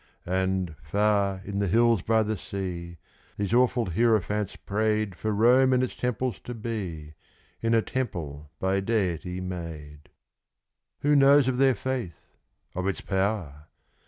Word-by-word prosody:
And, 95 -2 -1
far 100 +2 +1
in 100 0 -3
the 100 - +1
hills 115 +1 +3
by 110 +2 +2
the 110 +1 -1
sea, 90 -3 -5 0.4
these 100 +1 -2
awful 125 -1 +3
hierophants 105 +1 +1
prayed 110 0 -1
For 110 +5 -3
Rome 125 +5 +5
and 130 0 +3
its 130 - -3
temples 125 -2 -2
to 120 - -7
be 95 -10 -5 0.5
in 115 0 +2
a 115 - +3
temple 75 - -4
by 95 +1 +1
Deity 95 -4 -1
made. 80 -5 -7 0.9
Who 145 +1 +3
knows 140 -1 +6
of 130 -1 0
their 135 -2 +5
faith 125 - -5 0.4
of 90 +1 -2
its 100 - -2
power? 95 -7 -2
100 Hz, 140 wpm, -27 LUFS, 90-115 Hz, 0.9 s, knows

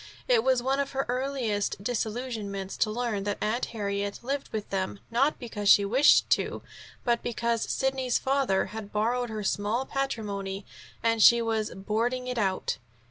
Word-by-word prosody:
It 485 -2 +4
was 255 -2 +2
one 270 +2 +1
of 280 0 -2
her 270 0 0
earliest 245 -6 -1
disillusionments 215 -4 -3
to 215 - +2
learn 220 -3 -2
that 205 -1 -1
Aunt 220 +4 0
Harriet 200 -2 -3
lived 275 +3 -3
with 215 -2 -3
them, 195 0 -2
not 270 +6 +2
because 210 -5 -2
she 200 - +7
wished 260 +8 +5
to, - - +1 0.4
but 235 -1 +1
because 235 -1 -1
Sidney's 265 -2 +1
father 265 -8 +1
had 220 -2 -7
borrowed 240 +3 0
her 215 -1 -4
small 210 +6 0
patrimony 205 -8 -3 0.4
and 230 -1 +2
she 235 +2 +8
was 225 -2 -1
"boarding 230 +6 -1
it 250 -2 -2
out." 190 -3 0
230 Hz, 160 wpm, -28 LUFS, 205-255 Hz, 0.4 s, she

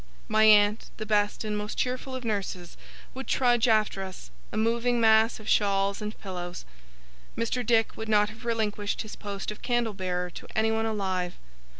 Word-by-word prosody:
My 215 0 +4
aunt, 210 0 +5
the 215 - -4
best 205 0 +1
and 210 -1 -2
most 210 0 -4
cheerful 255 +1 -2
of 255 -2 -6
nurses, 190 -5 -3 0.4
would 265 +1 -7
trudge 245 -2 +3
after 215 -3 +2
us, 185 - -8 0.2
a - - -4
moving 235 +2 +1
mass 220 0 +4
of 215 - -12
shawls 200 -1 +2
and 210 +1 -5
pillows. 180 -2 -6 0.7
Mr. 230 +2 -1
Dick 225 -1 +2
would 220 0 -6
not 210 -1 +4
have 225 +3 -13
relinquished 215 -3 -1
his 215 - -8
post 200 0 -5
of 210 - -10
candle 240 -3 0
bearer 180 -2 -3
to - - -10
anyone 220 0 +1
alive. 190 -4 -2
215 Hz, 175 wpm, -27 LUFS, 200-225 Hz, 0.7 s, aunt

